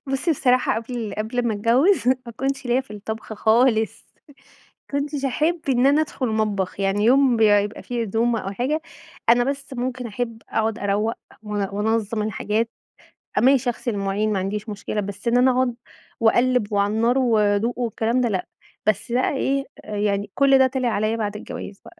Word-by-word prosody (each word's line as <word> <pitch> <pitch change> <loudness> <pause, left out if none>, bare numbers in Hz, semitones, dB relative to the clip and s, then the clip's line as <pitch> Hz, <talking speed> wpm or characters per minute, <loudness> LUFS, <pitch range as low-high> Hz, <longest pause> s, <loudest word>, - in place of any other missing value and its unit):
بُصّي 270 +5 -1
بصراحة 255 -4 +2
قبل 230 -2 -5
قبل 235 +3 -1
ما 220 - 0
اتجوّز 245 - +3
ما 255 -2 0
كنتش 270 +1 -2
ليّا 245 +2 +2
في 265 - -15
الطبخ 220 +2 -6
خالص، 220 +1 +2 0.2
ما 290 - -17 0.6
كنتش 285 0 -2
احب 310 +6 0
إن 255 -1 +3
أنا 285 +2 +4
ادخل 290 -4 -2
مطبخ، 205 -3 -1
يعني 195 +1 +1
يوم 260 +1 +5
ب - - -3
يا 205 -2 +6
يبقى 205 +1 -5
في 240 -1 -3
عزومة 230 +2 0
أو 195 - -5
حاجة 265 +10 -1 0.5
أنا 240 +1 +5
بس 275 0 -4
ممكن 250 0 -3
احب 230 +1 -5
أقعُد 220 0 -1
أروّق 210 +2 0 0.3
وان 205 -2 -2
وانظّم 215 +1 0
الحاجات، 215 +2 -1 0.7
أ - - +3
ماشي 265 0 +4
اغسل 240 +1 -4
المواعين 205 +1 -1
ما 200 - 0
عنديش 205 +3 -3
مشكلة 210 0 -3
بس 200 +3 -5
إن 235 - +3
أنا 250 +1 +5
اقعُد 255 -1 +1 0.5
واقلب 240 -1 +2
وعلى 200 +1 +1
النار 235 +4 +2
وادوق 225 -1 +2
والكلام 235 0 0
ده 245 - +2
لأ، 190 -4 -2 0.4
بس 215 +2 0
بقى 250 +2 +2
إيه 275 +1 0 0.2
آآ، 210 -1 -5
يعني 205 0 -1
كل 275 -1 +5
ده 265 - +6
طلع 255 -1 -1
عليّا 215 0 0
بعد 210 -2 -3
الجواز 200 -1 -8
بقى 345 - -15
230 Hz, 185 wpm, -23 LUFS, 210-255 Hz, 0.7 s, يا